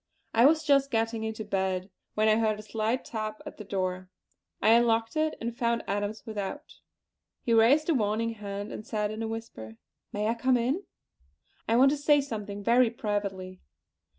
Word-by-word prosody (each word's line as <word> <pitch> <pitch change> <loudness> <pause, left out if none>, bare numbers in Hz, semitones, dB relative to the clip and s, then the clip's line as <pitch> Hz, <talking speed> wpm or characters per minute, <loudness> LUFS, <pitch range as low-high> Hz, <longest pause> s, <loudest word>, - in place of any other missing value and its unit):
I 235 +4 +6
was 315 +1 +3
just 275 -2 +3
getting 225 -1 -1
into 220 -1 -4
bed 190 -1 -2 0.2
when 215 +1 +2
I 215 0 +4
heard 220 -2 +1
a 215 - -9
slight 220 +4 -2
tap 215 -1 -4
at - - -9
the 210 - -7
door. 185 -2 -3 0.5
I - - +3
unlocked 225 0 +3
it 310 0 0
and 235 0 -4
found 235 -1 0
Adams 205 +1 -3
without. 215 +7 -5 0.7
He 235 - +1
raised 250 +8 +5
a 335 - +3
warning 225 -2 0
hand, 205 -1 -6
and - - -7
said 210 -1 -2
in 215 +1 -5
a 225 - -2
whisper: 220 - -7 0.3
"May 210 +1 -1
I 225 - +2
come 250 +2 +2
in? 265 +11 -1 0.8
I 225 - +2
want 270 +3 +6
to 295 - 0
say 290 0 +4
something 210 -7 -5
very 240 +2 +4
privately." 200 -4 -4
225 Hz, 180 wpm, -28 LUFS, 205-235 Hz, 0.8 s, I